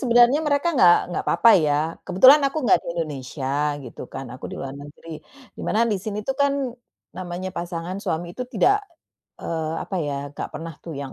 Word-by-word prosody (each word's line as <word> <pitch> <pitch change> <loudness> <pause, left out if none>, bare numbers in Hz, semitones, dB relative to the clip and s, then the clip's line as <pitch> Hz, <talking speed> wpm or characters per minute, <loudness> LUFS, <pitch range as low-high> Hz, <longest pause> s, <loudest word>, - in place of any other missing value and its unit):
sebenarnya 245 +3 +5
mereka 300 +2 +1
nggak 175 - +6 0.2
nggak - - -2
apa-apa 230 - +5
ya, 145 -1 +2 0.3
kebetulan 260 +11 +7
aku 290 -1 -4
nggak 220 - +4
di - - -17
Indonesia 145 -4 -5 0.4
gitu 120 - -9
kan, 135 - -7
aku 130 - -10
di - - -7
luar 135 -1 -6
negeri, 145 +3 -10 0.3
di - - -12
mana 225 +2 +2
di 215 -3 0
sini 210 +1 -5
tuh 270 - 0
kan, 280 +1 +1 0.6
namanya 180 +1 -5
pasangan 175 +2 -5
suami 170 -2 -3
itu 250 +5 -6
tidak, 385 - +3 0.6
eee, 160 -1 -3
apa 190 - -5
ya, 145 -2 -2 0.2
nggak - - -5
pernah 165 +1 -6
tuh 165 - -6
yang, 140 -2 -6
180 Hz, 190 wpm, -23 LUFS, 160-245 Hz, 0.6 s, kebetulan